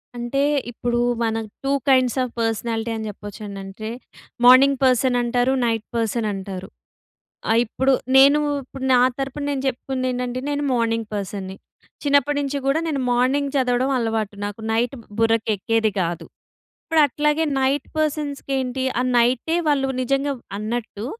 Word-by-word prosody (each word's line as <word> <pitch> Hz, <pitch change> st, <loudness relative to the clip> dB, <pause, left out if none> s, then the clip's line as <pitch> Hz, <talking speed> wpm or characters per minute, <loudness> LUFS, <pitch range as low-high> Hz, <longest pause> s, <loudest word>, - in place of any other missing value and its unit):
అంటే 240 Hz, +3 st, -1 dB, 0.3 s
ఇప్పుడు 240 Hz, 0 st, -1 dB, 0.2 s
మన 225 Hz, 0 st, 0 dB, 0.3 s
టూ 275 Hz, -, 0 dB, 0.2 s
కైండ్స్ 255 Hz, -1 st, +3 dB
ఆఫ్ 245 Hz, -, -4 dB
పర్సనాలిటీ 225 Hz, 0 st, -1 dB
అని 220 Hz, 0 st, -4 dB
చెప్పొచ్చండి. 205 Hz, 0 st, -8 dB
అంటే 215 Hz, +3 st, -7 dB, 0.6 s
మార్నింగ్ 270 Hz, +2 st, +7 dB
పర్సన్ 255 Hz, -1 st, +3 dB
అంటారు. 245 Hz, +2 st, +1 dB
నైట్ 225 Hz, -2 st, -1 dB
పర్సన్ 230 Hz, 0 st, 0 dB
అంటారు. 190 Hz, -1 st, -6 dB, 0.8 s
ఆహ్, 230 Hz, -, +4 dB
ఇప్పుడు 265 Hz, +4 st, +1 dB, 0.2 s
నేను 280 Hz, +2 st, +7 dB, 0.2 s
ఇప్పుడు 260 Hz, +1 st, -10 dB
నా -, -, +6 dB, 0.2 s
తరపున 270 Hz, +1 st, -3 dB
నేను 275 Hz, -, -2 dB
చెప్పుకుంది 260 Hz, 0 st, -3 dB
ఏంటంటే 250 Hz, 0 st, -3 dB
నేను 290 Hz, 0 st, -1 dB
మార్నింగ్ 230 Hz, -2 st, 0 dB
పర్సన్‌ని 195 Hz, -1 st, -4 dB, 0.5 s
చిన్నప్పటి 285 Hz, 0 st, +2 dB
నుంచి 285 Hz, 0 st, -2 dB
కూడా 275 Hz, +4 st, +2 dB
నేను 290 Hz, -3 st, -1 dB
మార్నింగ్ 260 Hz, +4 st, +2 dB
చదవడం 255 Hz, 0 st, +1 dB
అలవాటు 225 Hz, -3 st, -1 dB
నాకు 205 Hz, +2 st, -6 dB
నైట్ 230 Hz, +3 st, +1 dB, 0.3 s
బుర్రకెక్కేది 225 Hz, -1 st, +1 dB
కాదు. 170 Hz, -1 st, -3 dB, 0.6 s
ఇప్పుడు 320 Hz, -1 st, +3 dB
అట్లాగే 300 Hz, +3 st, +1 dB, 0.2 s
నైట్ 270 Hz, +1 st, 0 dB
పర్సన్స్‌కి 295 Hz, -2 st, -2 dB
ఏంటి 260 Hz, 0 st, -2 dB, 0.2 s
ఆ -, -, 0 dB
నైటే 245 Hz, +7 st, +2 dB
వాళ్ళు 275 Hz, -2 st, +2 dB
నిజంగా 275 Hz, +2 st, 0 dB, 0.2 s
అన్నట్టు 215 Hz, 0 st, -4 dB
245 Hz, 140 wpm, -22 LUFS, 225-275 Hz, 0.8 s, మార్నింగ్